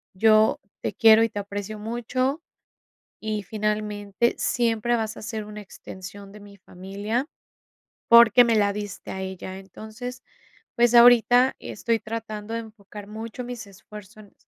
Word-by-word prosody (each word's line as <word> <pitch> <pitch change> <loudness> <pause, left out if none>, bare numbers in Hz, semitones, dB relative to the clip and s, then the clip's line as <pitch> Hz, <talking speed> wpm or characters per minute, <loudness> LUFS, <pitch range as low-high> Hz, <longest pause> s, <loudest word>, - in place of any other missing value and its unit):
“Yo 215 +2 +4 0.2
te - - -3
quiero 225 -2 +6
y 230 - +1
te - - -10
aprecio 205 +1 -6
mucho 240 +6 -2 0.8
y, 215 -1 -3
finalmente, 210 +1 -2
siempre 235 0 0
vas 220 -1 -3
a - - -9
ser 220 0 -5
una 210 0 -9
extensión 195 0 -11
de 210 - -13
mi 205 0 -14
familia 200 - -4 0.8
porque 235 +1 +7
me 230 - +2
la 205 -1 +3
diste 205 -1 -7
a 190 - -6
ella”. 190 0 -7
Entonces, 220 +6 -9 0.5
pues 240 0 +3
ahorita 245 +2 +6
estoy 225 +3 -2
tratando 220 -1 -6
de 230 - -2
enfocar 210 -2 -12
mucho 220 +3 -7
mis 240 -4 -7
esfuerzo 210 +2 -13
en 205 - -19
215 Hz, 145 wpm, -24 LUFS, 205-235 Hz, 0.8 s, porque